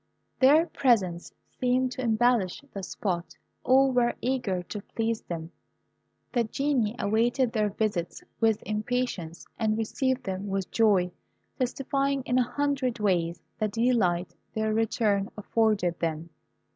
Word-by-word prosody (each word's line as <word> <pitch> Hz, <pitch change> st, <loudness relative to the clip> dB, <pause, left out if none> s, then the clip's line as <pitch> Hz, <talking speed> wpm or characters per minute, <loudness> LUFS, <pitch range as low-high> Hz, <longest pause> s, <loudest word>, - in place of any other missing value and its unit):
Their 295 Hz, +5 st, +6 dB
presence 195 Hz, -, +1 dB, 0.2 s
seemed 255 Hz, 0 st, 0 dB
to 255 Hz, -, -5 dB
embellish 235 Hz, -2 st, +2 dB
the 195 Hz, -, -5 dB
spot. 180 Hz, -2 st, -3 dB, 0.3 s
All 265 Hz, +1 st, +5 dB
were 245 Hz, -1 st, +2 dB
eager 245 Hz, -8 st, -1 dB
to 205 Hz, +3 st, -6 dB
please 225 Hz, +2 st, -2 dB
them. 165 Hz, -1 st, -6 dB, 0.8 s
The 240 Hz, -3 st, +3 dB
Genii 245 Hz, -2 st, 0 dB
awaited 235 Hz, +4 st, +1 dB
their 215 Hz, -2 st, +1 dB
visits 200 Hz, -4 st, -2 dB, 0.2 s
with 225 Hz, -2 st, +2 dB
impatience, 215 Hz, -6 st, -2 dB
and 215 Hz, -1 st, +1 dB
received 260 Hz, +3 st, -1 dB
them 190 Hz, -1 st, -4 dB
with 195 Hz, -1 st, -2 dB
joy, 200 Hz, -6 st, +3 dB, 0.5 s
testifying 275 Hz, +1 st, 0 dB
in 250 Hz, +1 st, +1 dB
a 245 Hz, -, +1 dB
hundred 280 Hz, -4 st, 0 dB
ways 175 Hz, -5 st, 0 dB, 0.2 s
the 215 Hz, -, +1 dB
delight 200 Hz, -7 st, +1 dB, 0.2 s
their 220 Hz, 0 st, 0 dB
return 215 Hz, -2 st, +1 dB
afforded 210 Hz, -5 st, +1 dB
them. 165 Hz, 0 st, -3 dB
220 Hz, 130 wpm, -27 LUFS, 195-250 Hz, 0.8 s, Their